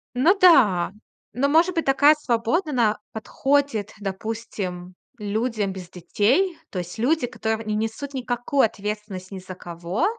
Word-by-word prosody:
Ну 325 +11 +4
да. 210 - +5 0.4
Но 275 +5 +1
может 335 +4 +4
быть, 330 - 0
такая 285 +3 +6
свобода, 275 +5 0
она 230 -6 +2
подходит, 270 -1 0
допустим, 195 -3 -5 0.2
людям 210 -1 -2
без 180 -2 -9
детей. 250 - +1
То 185 - -4
есть 175 +4 -7
люди, 295 +3 +2
которые 220 -2 -3
не 215 0 -1
несут 225 +6 -3
никакую 250 +1 0
ответственность 210 -3 -5
ни 195 - -6
за 185 0 -9
кого. 175 - -3
225 Hz, 140 wpm, -23 LUFS, 195-275 Hz, 0.4 s, такая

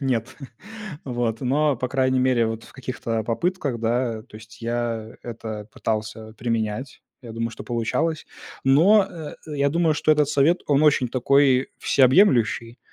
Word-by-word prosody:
нет. 130 -2 -2 0.7
Вот, 120 -3 -2
но, 140 +2 +1
по 125 +2 -3
крайней 130 0 +1
мере, 125 -3 +2
вот 110 0 -4
в - - -16
каких-то, 130 -3 -4
а, 110 - -2
попытках, 140 +1 -1
да, 115 -1 -1
то 110 -2 -14
есть 110 +1 -15
я 115 -1 -3
это 110 -3 -7
пытался 110 0 -4
применять. 115 +2 -3 0.2
Я 115 -2 -9
думаю, 115 +1 -3
что 115 - -10
получалось. 120 +7 -1 0.4
Но, 180 +10 +5
э, 160 -3 -8
э, 150 -2 -6
я 140 0 +3
думаю, 165 +1 +2
что 155 +1 +3
этот 150 -2 +2
совет, 150 +4 +3
он 145 0 +3
очень 145 -4 +3
такой 130 +1 +3
всеобъемлющий. 125 - +3
125 Hz, 160 wpm, -23 LUFS, 115-140 Hz, 0.7 s, Но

